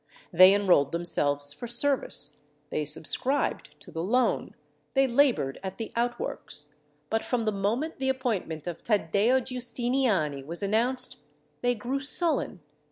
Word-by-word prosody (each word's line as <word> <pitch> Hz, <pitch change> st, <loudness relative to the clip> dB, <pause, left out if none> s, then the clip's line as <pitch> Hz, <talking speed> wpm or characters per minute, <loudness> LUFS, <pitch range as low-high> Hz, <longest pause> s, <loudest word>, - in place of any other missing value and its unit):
They 185 Hz, +3 st, +8 dB
enrolled 180 Hz, -9 st, +3 dB
themselves 145 Hz, -4 st, 0 dB
for 240 Hz, -, -8 dB
service. 240 Hz, -, +1 dB, 0.3 s
They 150 Hz, -, -1 dB
subscribed 250 Hz, -, +1 dB
to -, -, -13 dB
the 165 Hz, -, -4 dB
loan. 245 Hz, +8 st, 0 dB, 0.4 s
They 270 Hz, 0 st, +5 dB
laboured 245 Hz, -, +2 dB
at 190 Hz, 0 st, -6 dB
the 225 Hz, -, -6 dB
outworks. 235 Hz, -10 st, -4 dB, 0.4 s
But 225 Hz, -, 0 dB
from 240 Hz, -3 st, -1 dB
the 215 Hz, -, +1 dB
moment 225 Hz, +12 st, -2 dB
the 265 Hz, 0 st, 0 dB
appointment 220 Hz, -, -2 dB
of 175 Hz, -2 st, -6 dB
Taddeo 215 Hz, +4 st, +2 dB
Giustiniani 240 Hz, -, -1 dB
was 170 Hz, +7 st, -3 dB
announced, 235 Hz, +6 st, +1 dB, 0.4 s
they 245 Hz, 0 st, +1 dB
grew 245 Hz, +5 st, -3 dB
sullen. 290 Hz, -, 0 dB
225 Hz, 135 wpm, -27 LUFS, 170-255 Hz, 0.4 s, They